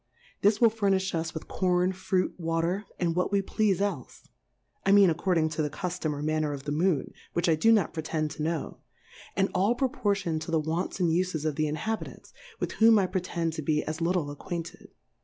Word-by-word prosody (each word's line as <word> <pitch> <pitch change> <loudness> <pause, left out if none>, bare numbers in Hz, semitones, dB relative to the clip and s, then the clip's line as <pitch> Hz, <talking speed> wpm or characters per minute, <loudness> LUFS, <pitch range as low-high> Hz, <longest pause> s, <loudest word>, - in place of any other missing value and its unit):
This 205 +1 +4
will 230 -2 +6
furnifli 195 -3 +1
us 165 -1 -2
with 160 - -6
Corn, 180 0 +1
Fruit, 185 0 -1
Water, 165 +4 -1
and 170 -2 0
what 180 +2 0
we 200 -1 +2
pleafe 200 -1 +1
elfe 195 -11 -3 0.3
\ - - -46
I 195 - +3
mean 200 -3 +7
according 165 -1 +1
to 155 0 -2
the 150 - 0
Cuftom 175 -1 -3
or 145 0 -5
Manner 155 -1 0
of 140 -1 -7
the 145 - -4
Moon, 160 -2 +1 0.2
which 170 0 0
I 165 - +5
do 160 +9 +4
not 210 -7 +3
pretend 155 -1 -2
to 155 - -7
know; 160 0 -2 0.6
and 195 0 +2
all 200 +6 +2
pro 260 +1 +1
portioned 200 - -1
to 155 - -6
the 165 -1 +2
Wants 160 +5 -2
and 175 -3 +2
Ufesof 160 -3 0
the 155 +2 0
Inhabitants, 215 +9 -4 0.3
with - - -2
whom 225 0 +5
I 195 - +3
pretend 175 -3 -2
to 155 - -4
be 150 0 +1
as 155 +1 -4
litde 170 -3 0
acquainted. 170 +3 -6
170 Hz, 205 wpm, -28 LUFS, 155-195 Hz, 0.6 s, mean